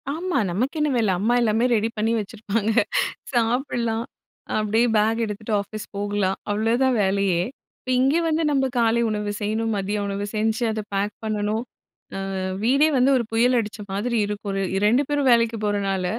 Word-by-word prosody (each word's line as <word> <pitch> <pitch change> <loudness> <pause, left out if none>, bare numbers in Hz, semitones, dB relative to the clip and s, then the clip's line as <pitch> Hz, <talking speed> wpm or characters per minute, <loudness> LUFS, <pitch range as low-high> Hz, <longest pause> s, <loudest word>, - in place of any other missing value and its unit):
ஆமா. 335 +2 -2
நமக்கு 245 - -1
என்ன 300 0 +2
வேல 220 -4 +2
அம்மா 220 +5 +2
எல்லாமே 225 +1 +2
ரெடி 220 +1 +1
பண்ணி 220 +2 +1
வச்சிருப்பாங்க. 215 +1 -2 0.6
சாப்படலாம். 235 -1 0 0.5
அப்டியே 220 +3 +2
பேக் 220 +2 +2
எடுத்துட்டு, 215 +1 -5
ஆபிஸ் 215 +1 -7
போகலாம் 200 -1 -1
அவ்ளோதான் 235 +5 +2
வேலையே. 190 -2 +1 0.5
இங்க 265 +4 +3
வந்து 320 0 +1
நம்ப 270 -2 +2
காலை 230 0 +3
உணவு 210 -1 -2
செய்யணும். 220 +2 -1
மதிய 200 +2 -2
உணவு 200 0 -3
செஞ்சு, 220 +2 0
அத 215 0 -3
பேக் 205 +1 0
பண்ணனும். 215 +1 -1 0.5
ஆ, - - -3 0.4
வீடே 275 +6 +4
வந்து 255 +2 +4
ஒரு 245 - 0
புயல் 240 +3 +3
அடிச்ச 215 -1 -5
மாதிரி 230 +5 -1
இருக்கும். 205 -1 -4
ரெ 195 - 0 0.2
2 240 +7 +4
பேரும் 285 -2 +2
வேலைக்கு 230 -1 +3
போறனால, 195 -2 0
220 Hz, 155 wpm, -23 LUFS, 205-240 Hz, 0.6 s, வீடே